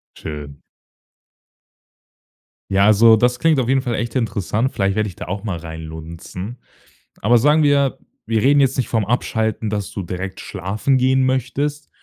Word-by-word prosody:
Schön. 75 -2 -8 2.1
Ja, 100 +1 +4
also 110 +2 +6
das 120 +2 +1
klingt 160 -3 +3
auf 125 -2 0
jeden 135 0 +2
Fall 120 -3 -2
echt 120 -1 -3
interessant. 115 0 -1
Vielleicht 95 -1 0
werde 110 0 0
ich 90 - -10
da - - -7
auch 95 +2 -4
mal 100 -6 -3
reinlunzen. 80 +6 -8 0.6
Aber 120 +4 +4
sagen 150 +6 +4
wir, 140 -2 +2 0.3
wir 110 -1 0
reden 140 +2 +4
jetzt 135 -2 +3
nicht 130 - 0
vom 110 -4 0
Abschalten, 110 -1 -1
dass 105 -2 -3
du 100 - -4
direkt 95 +2 -5
schlafen 105 +8 -1
gehen 130 +1 +3
möchtest, 135 +3 -1
110 Hz, 160 wpm, -20 LUFS, 95-130 Hz, 2.1 s, also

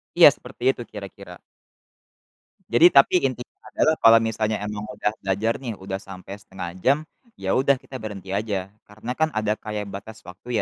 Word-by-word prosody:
Iya, - - +10
seperti 120 - -9
itu 130 - -1
kira-kira. 100 -3 -10 1.3
Jadi, 160 +9 +8
tapi 140 +6 +6
intinya 125 -2 -3 0.2
adalah 155 +1 +3
kalau 115 0 +7
misalnya 110 -1 -1
emang 105 0 -4
udah 115 -4 -2
belajar 100 +4 0
nih, 120 -4 -5
udah 95 0 -5
sampai 95 -1 -10
1/2 95 -3 -7
jam 140 +2 +4 0.4
ya - - -2
udah 140 +1 +4
kita 130 - -8
berhenti 100 -3 -8
aja. 100 -2 -2 0.2
Karena 110 +3 -7
kan, 160 0 +2
ada 110 -1 +1
kayak 105 -1 -5
batas 110 +3 -9
waktu 110 +6 -4
105 Hz, 165 wpm, -24 LUFS, 100-120 Hz, 1.3 s, Iya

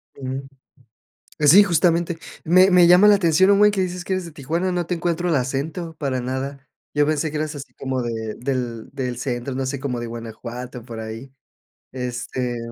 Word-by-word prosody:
Mm. 130 0 -4 1.0
Sí, 155 +7 +8
justamente. 170 -2 +2 0.3
Me 185 +3 +5
me 180 -1 +7
llama 180 +4 +7
la 205 - +8
atención 190 +1 +4
un 200 - +4
buen, 210 0 +6
que 195 -2 -1
dices 180 -1 -3
que 190 - -2
eres 185 -1 -2
de 165 - -9
Tijuana, 165 +6 -2
no 175 -1 -1
te 180 - -1
encuentro 175 +1 -1
el 165 - +2
acento 145 +6 -3
para 135 -3 -1
nada. 130 +2 -4 0.3
Yo 145 0 +4
pensé 155 +1 0
que 150 - -4
eras 155 0 -2
así 140 - -9
como 130 -1 -3
de 110 -2 -4
del 125 -3 -3
del 130 -3 -4
centro, 125 0 -3
no 135 0 -2
sé, 140 0 -3
como 130 -3 -3
de 120 - -5
Guanajuato, 120 +1 -7
por 115 -2 -8
ahí. 110 +4 -7 0.6
Este. 125 -1 -3
140 Hz, 195 wpm, -22 LUFS, 125-175 Hz, 1.0 s, Sí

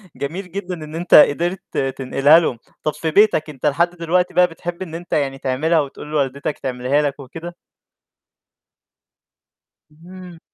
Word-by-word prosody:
جميل 180 +6 -5
جدًا 190 -1 -5
إن 155 -2 -8
أنت 175 +2 -2
قدرت 175 +5 +3
تنقلها 135 +3 +3
لهم. 130 -8 -2 0.3
طَب 155 - 0
في 160 -1 -3
بيتك 200 -5 +3
أنت 135 -4 -8
لحد 170 +4 +2
دلوقتي 175 +1 -1
بقى 180 0 +5
بتحب 170 +1 -7
إن 165 -3 -6
أنت 175 +1 -7
يعني 135 -2 0
تعملها 150 +6 +1
وتقول 145 +1 -5
لوالدتك 140 0 -2
تعملها 130 +3 0
لك 145 -1 -2
وكده؟ 165 +6 -9 2.4
إمم. 175 +2 -13
160 Hz, 140 wpm, -20 LUFS, 140-175 Hz, 2.4 s, بقى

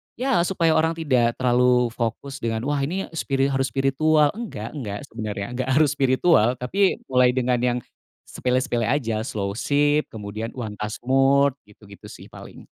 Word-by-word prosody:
ya 260 -2 +1
supaya 170 -4 +1
orang 160 +1 +2
tidak 130 -7 +1
terlalu 125 -1 +2
fokus 125 +4 -4
dengan, 115 -1 -2
wah, 145 +1 -1
ini 170 +8 -2
spiri 140 -4 -1
harus 135 0 0
spiritual 145 +4 +2
enggak 200 - -6
enggak 105 -9 -6
sebenarnya, 110 -3 -5
enggak 130 +1 -3
harus 150 -1 +4
spiritual, 130 -3 +3
tapi 190 +12 +1
mulai 125 -1 +5
dengan 125 -1 +1
yang 125 0 +1 0.5
sepele-sepele 125 -2 -1
aja, 115 -6 0
slowship, 140 +8 0
kemudian 110 +1 -6
one 115 -5 -5
task 105 +2 -5
mode, 135 +1 +3
gitu-gitu 105 -1 -15
sih - - -13
paling. - - -12
130 Hz, 150 wpm, -23 LUFS, 115-145 Hz, 0.5 s, mulai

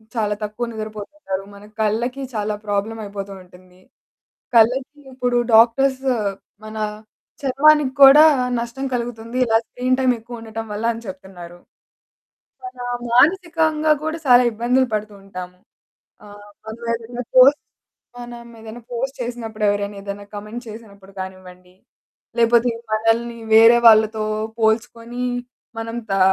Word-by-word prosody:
చాలా 210 -2 0
తక్కువ 215 +3 -4
నిద్రపోతుంటారు 215 -1 -6
మన 200 +1 -14 0.2
కళ్ళకి 235 +5 -1
చాలా 210 -1 -2
ప్రాబ్లమ్ 205 +2 -2
అయిపోతూ 200 -1 -7
ఉంటుంది. 180 0 -20 0.8
కళ్ళకి 255 +6 +3
ఇప్పుడు 250 -1 -1 0.2
డాక్టర్స్ 260 +4 +4 0.6
మన 215 0 -8 0.6
చర్మానికి 280 0 +3
కూడా 285 +3 +9 0.4
నష్టం 235 +3 -5
కలుగుతుంది 235 0 -4
ఇలా 225 -1 +3
స్క్రీన్ 255 +1 -1
టైమ్ 255 -1 +3
ఎక్కువుండటం 225 -1 -8
వల్ల 215 +2 -4
అని 230 - -9
చెప్తున్నారు. 185 -2 -10 1.1
మనా 255 -10 -8 0.3
మానసికంగా 315 +1 +3
గూడా 315 +1 -3
చాలా 250 0 +7
ఇబ్బందులు 245 +4 +1
పడుతూ 210 0 -3
ఉంటాము. 180 -2 -9 0.7
ఆహ్, 205 0 -13 0.2
మనమేదైనా 230 +1 -5
పోస్ట్ 270 +3 +7 0.6
మనమేదైనా 235 -1 -10
పోస్ట్ 265 +3 -4
చేసినప్పుడు, 230 -3 -5
ఎవరైనా 205 0 -2
ఏదైనా 200 0 -7
కామెంట్ 210 +4 -7
చేసినప్పుడు 205 -3 -12
కానివ్వండి, 185 -1 -10 0.6
లేకపోతే 235 +1 +3 0.2
మనల్ని 225 +2 0 0.2
వేరే 225 +2 +8
వాళ్ళతో 220 0 +4 0.3
పోల్చుకొని 230 +2 -1 0.6
మనం 230 +1 -5 0.2
తా 195 - +1
230 Hz, 110 wpm, -20 LUFS, 210-245 Hz, 1.1 s, కూడా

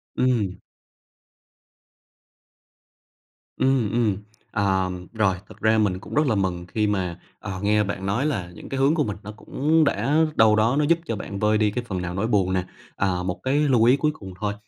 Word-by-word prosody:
Ừm. 110 -8 +1 3.0
Ừm, 130 -5 +1
ừm. 115 -4 +1 0.3
À, 95 -3 +1 0.2
rồi, 105 -4 +2
thực - - -13
ra 110 +1 +3
mình 100 -4 +1
cũng - - -11
rất 150 +1 +3
là 115 - +2
mừng 90 -3 -1
khi 105 +3 0
mà, 90 -4 -2 0.2
à, 100 - -6
nghe 105 +1 +3
bạn 95 -1 -4
nói 110 +8 0
là 95 -13 -2
những - - -11
cái 135 - -3
hướng 140 +4 +3
của 155 - +2
mình 105 -6 -4
nó 105 - -7
cũng 150 +8 +1
đã 145 0 +1 0.2
đâu 110 -1 +5
đó 110 +4 +2
nó - - +3
giúp 170 +2 +3
cho 115 - -2
bạn 100 -1 -6
vơi 105 +1 +3
đi 105 -1 +2
cái 125 +3 -3
phần 95 -4 -3
nào 90 -1 -4
nỗi 100 +5 -1
buồn 95 -5 +1
nè. 90 -1 +1 0.3
À, 90 -2 0
một 90 +1 -3
cái 130 +1 +1
lưu 135 -6 +3
ý 125 +4 +5
cuối 150 +1 +1
cùng 95 -11 -10
thôi 105 -1 -1
105 Hz, 200 wpm, -24 LUFS, 95-125 Hz, 3.0 s, đâu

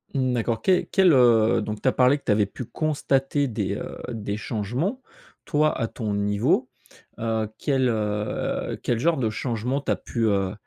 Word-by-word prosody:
Mmh, 130 -2 +1
d'accord. 115 -1 -1
Que 185 -2 +3
quel, 190 -4 +5
heu, 115 -4 +5
donc 105 0 -5
tu - - -1
as - - +5
parlé 130 +3 +4
que - - -18
tu - - +2
avais 105 0 +3
pu 125 - -7
constater 140 -1 0
des, 105 -5 -2
heu, - - -6
des 105 -3 -4
changements. 125 - -3 0.4
Toi, 155 +1 +1
à 115 - 0
ton 110 -2 -4
niveau, 105 +6 +1 0.5
heu, 110 -1 -1
quel, 135 -3 +1
heu, 105 -2 -2
quel 120 -2 0
genre 165 +5 +2
de 115 -4 0
changement, 120 +4 -2
tu - - -2
as - - +3
pu, 115 - -5
heu, 100 -2 +1
120 Hz, 185 wpm, -24 LUFS, 105-135 Hz, 0.5 s, quel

